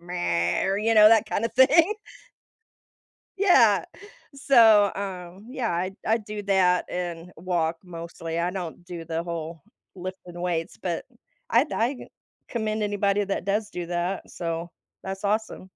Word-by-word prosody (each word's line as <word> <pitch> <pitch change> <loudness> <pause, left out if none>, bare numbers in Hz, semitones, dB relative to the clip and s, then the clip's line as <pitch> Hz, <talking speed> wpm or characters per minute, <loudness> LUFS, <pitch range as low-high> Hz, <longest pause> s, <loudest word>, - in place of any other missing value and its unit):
or 175 - 0
you 225 +2 +1
know 215 -1 +9
that 220 0 +4
kind 215 - -1
of 230 - -2
thing. 315 +10 +5 1.4
Yeah. 265 - +5 0.5
So, 230 -8 +5
um, 190 0 -7
yeah, 255 -3 -2
I 185 +3 -2
I 225 +1 +3
do 210 -1 -7
that 185 -2 +3
and 175 -1 -5
walk 165 -1 -1
mostly, 165 -1 -6
I 175 +1 0
don't 180 -2 -6
do 170 -2 -7
the 165 +1 -3
whole 165 -2 -6 0.3
lifting 180 -1 -8
weights 175 -2 -2
but 175 -3 -3 0.5
I 240 +6 +4
I 245 +4 0 0.5
commend 220 -3 -2
anybody 205 0 +1
that 195 0 -3
does 205 +1 0
do 175 -3 -6
that, 175 +2 -3
so 170 0 -4 0.3
that's 190 +1 -6
awesome. 210 -2 -2
190 Hz, 140 wpm, -25 LUFS, 175-215 Hz, 1.4 s, know